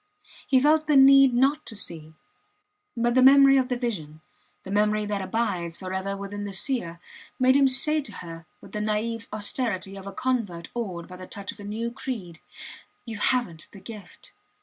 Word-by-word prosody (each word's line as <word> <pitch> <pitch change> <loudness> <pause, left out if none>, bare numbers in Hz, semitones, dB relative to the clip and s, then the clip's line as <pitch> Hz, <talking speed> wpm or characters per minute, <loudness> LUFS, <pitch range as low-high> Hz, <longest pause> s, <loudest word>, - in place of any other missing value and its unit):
He 265 -3 +4
felt 305 +3 +3
the 300 - +3
need 275 0 +7
not 275 +5 +2
to 220 - -6
see. 160 -5 -8 0.8
But 235 +1 +1
the 255 - +4
memory 275 +1 +7
of 260 -1 +1
the 250 - 0
vision, 160 -11 -5 0.4
the 190 - -8
memory 210 +1 +1
that 205 -1 -2
abides 185 -5 -2
forever 190 +1 -4
within 200 +1 -6
the 200 -1 -5
seer 190 -7 -2 0.4
made 260 +1 +4
him 275 -1 +5
say 300 +4 +3
to 220 -7 -8
her 165 -3 -9
with - - -14
the 210 - -4
naive 220 +2 -2
austerity 205 -2 -3
of 195 0 -9
a - - -5
convert 205 -9 -3
awed 185 -8 -5
by 180 - -11
the 185 0 -10
touch 200 -2 -6
of - - -16
a - - -9
new 220 +3 -4
creed, 230 -10 -6 0.7
You 225 -3 -7
havent 205 -11 -1
the 200 - -11
gift. 200 -2 -12
210 Hz, 185 wpm, -25 LUFS, 190-255 Hz, 0.8 s, need